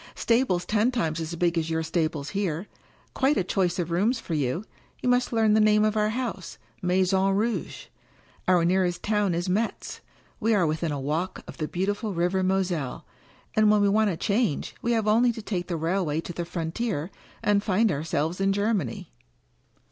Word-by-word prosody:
Stables 230 -7 +1
ten 215 +4 +2
times 170 -11 -1
as 165 +1 -4
big 170 0 +1
as 160 0 -3
your 160 0 0
stables 160 -3 -2
here 190 -3 -2 0.3
— - - -34
quite 275 +2 +2
a - - +2
choice 180 -1 0
of 170 -2 -2
rooms 215 +8 +1
for 180 - -6
you. 150 +6 -1 0.3
You 250 - -1
must 245 0 +2
learn 220 -2 +3
the 220 - +4
name 215 0 +4
of 215 0 +1
our 215 0 +2
house 225 -6 -4
— - - -35
Maison 190 +2 +2
Rouge. 225 +3 -2 0.6
Our 180 -2 +4
nearest 180 -1 +1
town 210 -4 +1
is 175 +2 -2
Metz. 210 +5 -2 0.4
We 225 0 +2
are 185 -4 +3
within 155 +1 -1
a 145 - -2
walk 155 +7 -2
of - - -10
the 155 -2 -2
beautiful 205 +4 -2
River 175 +3 +1
Moselle. 185 -7 -1 0.5
And 215 -1 +5
when 210 0 +5
we 200 - +4
want 215 +1 +3
a 175 - -2
change 205 - 0
we 235 - +1
have 220 -2 0
only 235 +3 +4
to 225 - -7
take 180 -5 -3
the 170 - -2
railway 165 -1 0
to 175 - -7
the 170 0 -4
frontier, 170 +1 -3 0.3
and 205 -1 +3
find 210 +1 +2
ourselves 160 +3 -2
in 195 0 +3
Germany." 200 - -1
190 Hz, 195 wpm, -26 LUFS, 170-215 Hz, 0.6 s, And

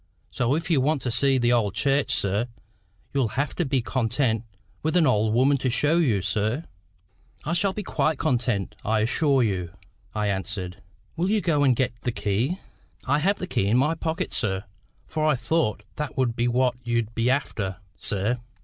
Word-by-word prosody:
So 125 +3 +1
if 165 +2 -2
you 145 -5 +4
want 150 +1 +1
to 125 - -1
see 135 +2 +3
the 120 -1 +3
old 105 -4 +1
church, 140 +4 +2
sir, 100 +4 0 0.7
you'll 125 -6 0
have 140 0 0
to 175 - -1
be 135 -3 0
content 115 -2 0 0.4
with 160 +3 -1
an 170 - +5
old 110 -5 +3
woman 130 +5 +4
to 130 - 0
show 150 +7 +3
you, 115 - +2
sir." 110 +7 0 0.8
"I 160 - 0
shall 190 +3 +1
be 210 - -4
quite 155 -5 0
content, 120 -7 0
I 110 0 +1
assure 135 +3 +3
you," 90 -6 -2 0.4
I 105 0 0
answered. 95 -1 -3 0.3
"Will 175 +3 0
you 215 +1 +3
go 160 -7 +2
and 130 -3 +4
get 120 -1 -1
the 125 - -1
key?" 115 - -1 0.5
"I 145 +3 +2
have 195 +6 +2
the - - -4
key 100 - 0
in 110 +4 +3
my 150 +5 +3
pocket, 165 0 -3
sir; 95 -3 -1 0.4
for 155 -1 -3
I 155 -2 +4
thought 125 -1 0
that 150 -1 -4
would 125 -3 +1
be 120 0 +1
what 125 +1 +2
you'd 115 -2 -1
be 115 +2 +1
after, 105 -8 -1 0.2
sir. 105 +5 -1
125 Hz, 190 wpm, -25 LUFS, 110-150 Hz, 0.8 s, an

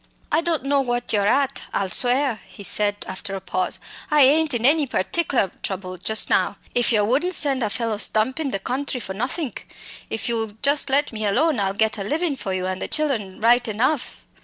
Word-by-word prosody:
"I 315 - +3
don't 330 -5 -1
know 280 0 +2
what 245 -2 -2
you're 205 -1 +2
at, 275 +3 +1
I'll 195 -2 -1
swear," 250 +1 +2
he 190 +2 -12
said 205 +1 +2
after 195 +1 -5
a - - -4
pause. 185 0 -2 0.3
"I 300 -2 +4
ain't 300 +1 +4
in 235 0 0
any 295 +1 +4
pertickler 240 - 0
trouble 185 -1 -5
just 220 +4 +1
now - - +1 0.2
if 245 0 +2
yer 215 -3 +3
wouldn't 290 - +1
send 275 -3 +1
a 215 - 0
fellow 225 0 -2
stumpin' 260 +9 0
the 225 - -2
country 255 +6 -3
for 190 -4 -6
nothink. 250 - -3 0.4
If 225 - -3
you'll 225 -3 0
just 285 0 +4
let 285 +2 +3
me 215 -1 -2
alone 270 +6 +2
I'll 195 -1 0
get 220 0 0
a - - -2
livin' 305 - -1
for 200 -7 -5
you 185 -1 -2
and 185 0 -3
the - - -2
chillen 235 -12 -2
right 240 +2 +4
enough. 250 +6 -1
240 Hz, 205 wpm, -22 LUFS, 205-280 Hz, 0.4 s, I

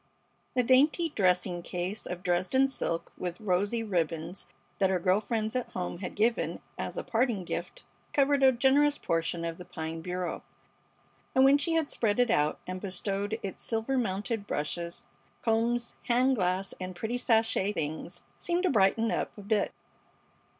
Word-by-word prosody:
The 250 - +3
dainty 290 +7 +4
dressing 180 -2 +2
case 180 +4 -4
of 180 0 -5
Dresden 185 +10 +2
silk 170 -10 -3
with 180 -1 -4
rosy 205 +3 0
ribbons 170 -2 -2 0.3
that 190 -1 +4
her 190 - +2
girl 185 +3 +2
friends 220 +1 -2
at 250 - -1
home 180 -1 -3
had 185 - -5
given 230 +3 +1 0.2
as - - -5
a - - -2
parting 230 -4 +1
gift - - -5 0.3
covered 280 0 +3
a 265 -1 +7
generous 275 +4 +3
portion 165 0 -1
of 165 +1 -4
the - - -7
pine 160 -1 -5
bureau, 180 0 -3 0.9
and 260 - +6
when 280 +1 +6
she 325 +3 0
had 320 -3 +1
spread 215 -1 +1
it 245 -3 +4
out 150 +1 +2
and 185 0 -5
bestowed 200 +2 -2
its 195 - -5
silver 225 +4 -1
mounted 205 -2 -1
brushes, 170 +7 -3 0.4
combs, 235 +1 +1
hand 255 +2 +4
glass, 185 -1 0
and 185 0 -5
pretty 230 +6 -2
sachet, 225 -4 +2
things 160 +2 -4 0.2
seemed 350 +1 0
to 370 - +3
brighten 225 +1 +3
up - - -2
a 205 - -9
bit. 205 0 +1
205 Hz, 165 wpm, -29 LUFS, 180-245 Hz, 0.9 s, a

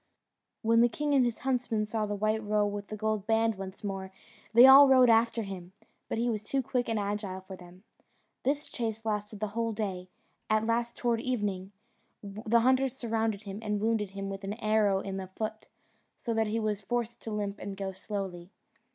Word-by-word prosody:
When 230 +1 +4
the 240 - +5
king 295 +4 -1
and 270 -2 +5
his 240 -2 0
huntsmen 245 -4 0
saw 215 0 -2
the 205 - -2
white 215 +2 0
roe 210 0 +2
with 205 0 -4
the 215 - -6
gold 215 -1 -1
band 225 0 +3
once 190 0 -8
more, 195 -2 -4 0.4
they 235 +3 +9
all 275 +2 +10
rode 255 -3 +6
after 230 0 +3
him, 185 -2 -8 0.4
but - - -2
he 235 +2 0
was 220 -3 -1
too 265 +5 -1
quick 250 -1 -1
and 225 - 0
agile 200 -2 -3
for 190 0 -9
them. 180 +1 -15 0.6
This 290 +3 0
chase 225 -1 -4
lasted 210 -1 -2
the 215 0 -2
whole 230 +1 -2
day; 190 -4 -4 0.4
at 215 0 +2
last, 235 +1 -1
towards 235 -2 0
evening, 205 -6 -2 0.5
the 215 +3 +1
hunters 260 +1 +2
surrounded 225 -3 -1
him, 200 0 -6
and 210 -2 -1
wounded 215 -1 0
him 195 0 -3
with 195 0 -6
an 200 +2 -3
arrow 215 -3 +2
in 195 -1 -5
the 190 -1 -5
foot, 215 +3 -5 0.5
so 235 - -3
that 225 -1 +1
he 220 +2 -1
was 215 -2 -1
forced 235 +2 -3
to 225 - -6
limp 205 -1 -3
and 195 -1 -6
go 195 -1 -3
slowly. 190 -2 -6
215 Hz, 200 wpm, -30 LUFS, 200-230 Hz, 0.6 s, all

